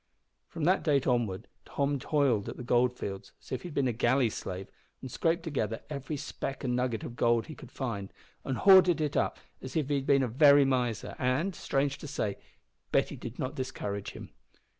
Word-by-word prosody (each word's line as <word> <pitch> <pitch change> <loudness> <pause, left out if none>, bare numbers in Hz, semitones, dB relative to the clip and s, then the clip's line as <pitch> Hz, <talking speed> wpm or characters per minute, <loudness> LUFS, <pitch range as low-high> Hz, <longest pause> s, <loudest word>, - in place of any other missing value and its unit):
From 165 - -6
that 185 +4 +3
date 140 -5 +2
onward 120 -7 0 0.2
Tom 140 0 -1
toiled 135 -8 +1
at - - -7
the - - -6
goldfields 120 -5 0
as - - -18
if 130 - -2
he - - -7
had 165 - -9
been 135 -2 +2
a - - +1
galley 120 +1 +2
slave, 95 0 -5 0.3
and 130 - -8
scraped 165 +5 0
together 115 - -2
every 145 +1 -4
speck 135 0 -5
and 125 -2 0
nugget 125 -3 -1
of 120 - -7
gold 120 -1 +2
he 155 - -8
could 130 -4 -13
find, 105 -7 -4 0.3
and 130 -2 -2
hoarded 185 -4 +7
it 150 -2 -1
up - - +1 0.2
as 130 0 -8
if 150 -4 0
he 145 - +2
had 135 - -4
been 140 -1 +4
a - - +1
very 140 +3 +6
miser, 125 -4 -1
and, 130 +10 +1
strange 140 -3 -1
to - - -8
say, 105 -8 -2 0.5
Betty - - +1
did - - -8
not 130 - -3
discourage 105 -6 -4
him. - - -10
130 Hz, 205 wpm, -30 LUFS, 120-145 Hz, 0.5 s, hoarded